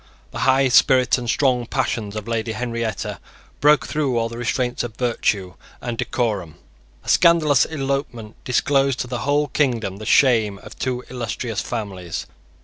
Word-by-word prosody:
The - - -6
high 135 +1 +4
spirit 125 +1 +4
and 120 -1 -5
strong 125 -2 +1
passions 115 -5 -2
of 105 0 -5
Lady 115 -1 -2
Henrietta 115 -3 -3 0.4
broke 150 0 +4
through 140 -5 -1
all 115 0 0
restraints 120 +1 -2
of 115 -2 -6
virtue 105 -6 -1 0.3
and 120 -1 -4
decorum. 105 - -2 0.5
A - - -19
scandalous 155 -6 +5
elopement 135 -7 -4
disclosed 135 +1 +2
to 125 - -4
the 125 0 -4
whole 145 +3 +1
kingdom 120 -8 0
the 110 0 -8
shame 115 -8 +4
of - - -11
two 125 -2 -2
illustrious 115 -2 -3
families. 95 -7 -5
120 Hz, 145 wpm, -21 LUFS, 110-135 Hz, 0.5 s, scandalous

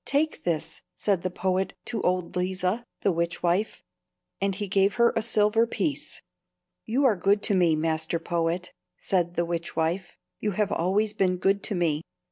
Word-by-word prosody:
"Take 300 +2 0
this," 160 -1 -2
said 195 -4 0
the 185 - -1
poet 185 +1 -1
to 225 -4 -2
old 180 -1 0
Leeza, 185 +5 -1 0.2
the 200 - +3
witchwife; 170 +4 -1 0.6
and 195 -1 +1
he 205 +1 -3
gave 195 +1 +2
her 235 0 +4
a 225 - +2
silver 220 +1 +3
piece. 290 +5 -3 0.6
"You 260 +6 +1
are 235 -5 +5
good 200 +3 +2
to 210 - +2
me, 175 -4 +4
master 160 +1 0
poet," 170 +1 -2 0.2
said 175 -2 0
the 170 - +1
witchwife. 170 +1 -2 0.2
"You 210 -1 -1
have 210 +1 0
always 205 +5 +1
been 185 -3 +1
good 195 +2 +2
to 210 - -1
me. 160 -4 +1
185 Hz, 165 wpm, -26 LUFS, 170-210 Hz, 0.6 s, are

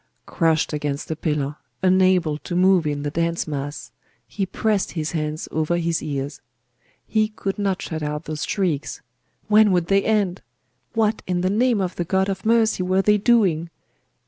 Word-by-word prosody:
Crushed 160 -2 +1
against 145 0 -3
a - - -1
pillar, 150 -2 -2 0.3
unable 185 -4 +3
to 175 - -5
move 185 -2 +4
in 145 -1 -2
the 145 - -2
dense 170 +1 -1
mass, 145 -1 -5 0.3
he 195 -2 -3
pressed 210 0 0
his 155 -2 -2
hands 155 -1 -3
over 160 +2 0
his 170 -1 0
ears. 145 -1 -4 0.6
He 215 -1 +1
could 210 -2 -5
not 195 -2 -1
shut 160 -1 -4
out 150 +1 -3
those 155 -1 -4
shrieks! 170 -11 -2 0.4
When 215 -1 +5
would 175 -2 +1
they 195 0 +3
end? 205 -4 +1 0.5
What 220 -1 +1
in 180 -1 0
the 185 +1 +1
name 235 +1 +2
of 185 -2 -2
the 175 - 0
God 190 +3 +1
of 195 +2 -3
mercy 225 -3 +3
were 185 +1 +1
they 210 +1 +4
doing? 195 -8 +2
180 Hz, 170 wpm, -22 LUFS, 155-195 Hz, 0.6 s, When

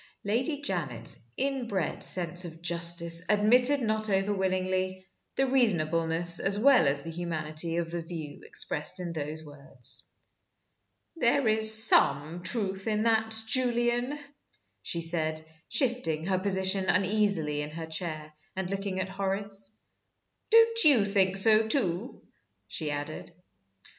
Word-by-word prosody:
Lady 255 +8 -2
Janet's 150 - -5
inbred 245 - -3
sense 175 0 +4
of 165 -2 -9
justice 170 0 0
admitted 245 +7 +3
not 215 -1 -2
over 195 +1 0
willingly 185 -1 -3 0.3
the 270 - +1
reasonableness 170 -8 +1
as 195 +1 0
well 255 - +4
as 140 0 -1
the 165 - -7
humanity 165 -1 -3
of 170 -1 -3
the 170 0 -4
view 160 -3 -9
expressed 150 +4 -3
in 175 -2 -6
those 155 0 -6
words. 140 -4 -5 1.1
"There 265 -2 +1
is 220 0 +9
some 155 +5 +2
truth 195 -1 -2
in 215 -1 -1
that, 220 -1 +4
Julian," 240 +2 0 0.6
she 170 - -4
said, 160 -1 -1 0.2
shifting 200 - -2
her 190 0 -1
position 190 0 -1
uneasily 185 -5 0
in 150 - -6
her 160 +1 -8
chair, 160 -2 -6 0.2
and 190 -1 -5
looking 195 -1 -4
at 185 0 -4
Horace. 195 +1 -4 0.7
"Don't 455 0 +4
you 270 -10 +5
think 195 -2 0
so, 220 +2 +4
too?" 220 -2 -2 0.4
she 155 -2 -5
added. 145 +3 -7
190 Hz, 130 wpm, -27 LUFS, 165-220 Hz, 1.1 s, is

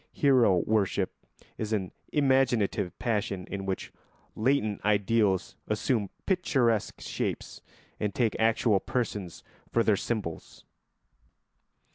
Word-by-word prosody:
Hero 125 -9 +4
worship 105 -3 +1 0.5
is 110 0 -2
an 95 -4 -1 0.2
imaginative 120 - +2
passion 100 -5 -1
in 95 -1 -4
which 95 - -3 0.4
latent 110 -3 +1
ideals 105 -2 +2
assume 105 -1 0 0.2
picturesque 130 - +1
shapes - - -4 0.4
and 105 - 0
take 115 -4 +1
actual 110 -2 +3
persons 105 -7 -3 0.3
for 115 - +3
their 110 - +4
symbols. 100 -6 -4
110 Hz, 100 wpm, -28 LUFS, 100-120 Hz, 0.5 s, Hero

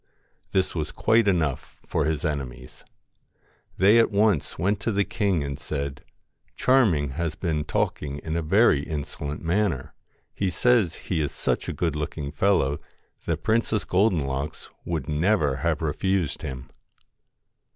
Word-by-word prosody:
This 95 -1 +1
was 75 -3 -3
quite 110 -1 +3
enough 80 -8 0
for - - 0
his 80 +2 -1
enemies. 65 -4 -5 0.9
They 105 +5 +6
at 115 - +4
once 105 -5 +1
went 100 +5 +1
to 115 - -1
the 100 -1 +2
king 100 -7 0
and 70 -1 -5
said: 70 -2 -4 0.3
' - - -43
Charming 105 - +3
has 80 +3 -3
been 80 -3 -1
talking 70 -1 -2
in 80 +2 -4
a 85 - 0
very 80 -2 +4
insolent 75 0 -5
manner. 85 -5 0 0.4
He 95 - -1
says 110 -3 +2
he 85 -4 -2
is 75 - -1
such - - -1
a - - -2
good - - -1
looking 75 -1 -4
fellow 75 -4 +2 0.5
that 85 -1 -2
Princess 110 -2 +1
Golden 90 -4 +2
locks 70 +3 -4
would 80 -5 -3
never 75 -2 +2
have 85 0 -1
refused 90 +1 0
him.' 65 -1 -7
80 Hz, 150 wpm, -25 LUFS, 75-100 Hz, 0.9 s, They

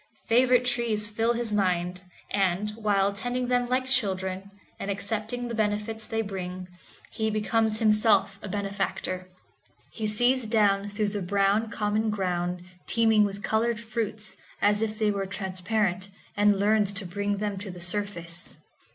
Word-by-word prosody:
Favorite 250 +1 +5
trees 235 -4 +1
fill 225 +3 +1
his 235 -2 -1
mind, 180 -2 0 0.3
and, 195 +1 +1
while 205 -2 +1
tending 245 +4 -2
them 245 -1 +2
like 255 +1 +1
children, 195 -6 0 0.3
and 200 - -4
accepting 215 +4 -2
the 235 - -4
benefits 215 0 -1
they 225 0 -1
bring, 185 -2 -5 0.4
he 220 0 -1
becomes 215 +1 +1
himself 210 -3 +3
a 205 - -6
benefactor. 195 -2 -2 0.6
He 220 -2 -3
sees 245 +3 +2
down 205 -3 +3
through 205 0 0
the 205 0 -3
brown 200 +4 +2
common 215 0 0
ground 180 -3 -1 0.2
teeming 220 -2 +4
with 200 0 -5
colored 230 +1 +1
fruits, 215 -2 -4 0.2
as 205 +1 +3
if 220 0 -2
it 210 -1 +3
were 195 -1 -2
transparent, 190 0 -1 0.3
and 205 -1 +4
learns 205 0 +3
to 200 0 -3
bring 200 +3 -1
them 205 -1 -2
to 200 0 -6
the 180 -1 -8
surface. 175 -2 -3
210 Hz, 150 wpm, -27 LUFS, 195-220 Hz, 0.6 s, Favorite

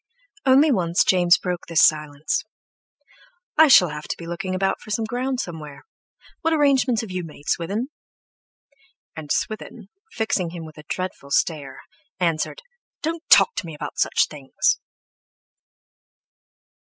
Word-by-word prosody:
Only 280 +4 +6
once 175 -6 +2
James 175 -2 +4
broke 180 -1 -4
this 165 -1 +3
silence: 150 -1 +1 1.1
"I 315 - +7
shall 185 - +7
have 150 0 -7
to - - -4
be 170 - -9
looking 175 +2 -4
about 195 +1 0
for - - -13
some 220 +1 -1
ground 255 +3 -2
somewhere. 155 - -7 0.6
What 325 - +1
arrangements 275 -5 +3
have 220 -4 -8
you 185 -1 -3
made, 150 -2 -12
Swithin?" 205 +10 -1 1.3
And 155 -2 -7
Swithin, 215 -1 -3 0.2
fixing 210 -6 -1
him 165 -1 -8
with 155 -1 -12
a 150 - -13
dreadful 185 -6 -5
stare, 140 -2 -1 0.4
answered: 170 - -1 0.4
"Don't 325 +1 -2
talk 475 - +7
to - - -2
me 160 - -7
about - - -7
such - - +3
things!" 140 -3 -1
180 Hz, 140 wpm, -23 LUFS, 155-230 Hz, 1.3 s, I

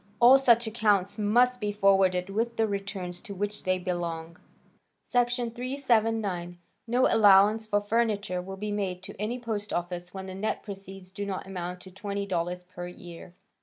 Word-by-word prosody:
All 250 +3 +8
such 235 -3 +4
accounts 210 -2 +1
must 245 +4 +3
be 210 0 0
forwarded 195 -2 +3
with 230 +3 -1
the 225 - +3
returns 195 -3 -4
to 205 -4 -8
which 205 +2 -4
they 185 0 +2
belong." 170 -2 -4 0.7
Section 245 -1 0
379. 225 -8 0 0.3
"No 245 +2 +3
allowance 210 +1 +5
for 205 -1 +1
furniture 205 -4 0
will 190 +1 -8
be 210 +1 -4
made 190 -3 -2
to - - -8
any 225 +4 -1
post 220 -4 -4
office 175 0 -3
when 190 -1 -7
the 190 - -7
net 195 +3 -2
proceeds 195 -2 -9
do 200 +1 -5
not 195 -2 -4
amount 180 -1 -5
to 190 - -12
$20 185 -3 -3
per 175 -1 -7
year." 175 0 -11
200 Hz, 165 wpm, -28 LUFS, 180-220 Hz, 0.7 s, All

